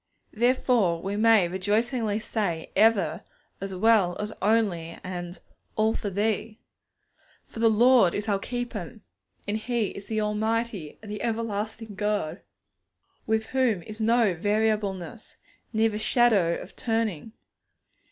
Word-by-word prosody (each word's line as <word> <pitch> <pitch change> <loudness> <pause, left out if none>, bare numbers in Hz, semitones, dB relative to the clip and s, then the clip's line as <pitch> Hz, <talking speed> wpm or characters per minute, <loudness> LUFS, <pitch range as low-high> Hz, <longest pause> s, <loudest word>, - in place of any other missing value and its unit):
Therefore 235 -6 +2
we 195 +4 -3
may 220 -3 +5
rejoicingly 210 +4 0
say 200 -7 -3
'ever' 215 0 +3 0.4
as 195 -1 -4
well 195 -3 +3
as 210 +1 -4
'only' 195 -6 +1
and 175 -1 -6 0.4
'all 220 +1 +2
for 205 - -3
Thee!' 215 +2 -1 0.9
For - - -11
the 225 0 +5
Lord 230 -3 +5
is 205 +1 -3
our 200 -2 +1
Keeper, 230 -4 -5 0.5
and 205 +1 0
He 230 -2 -1
is 200 - -9
the 220 -1 -1
Almighty 215 -4 -2
and 210 - -8
the 210 - -5
Everlasting 220 -1 -3
God, 205 -4 -2 0.9
with 220 0 +1
whom 240 -9 +2
is 215 +4 -8
no 225 -3 +3
variableness, 210 +1 -1 0.3
neither 220 -1 +1
shadow 220 -8 +3
of - - -11
turning. 225 -4 -2
215 Hz, 125 wpm, -26 LUFS, 195-225 Hz, 0.9 s, may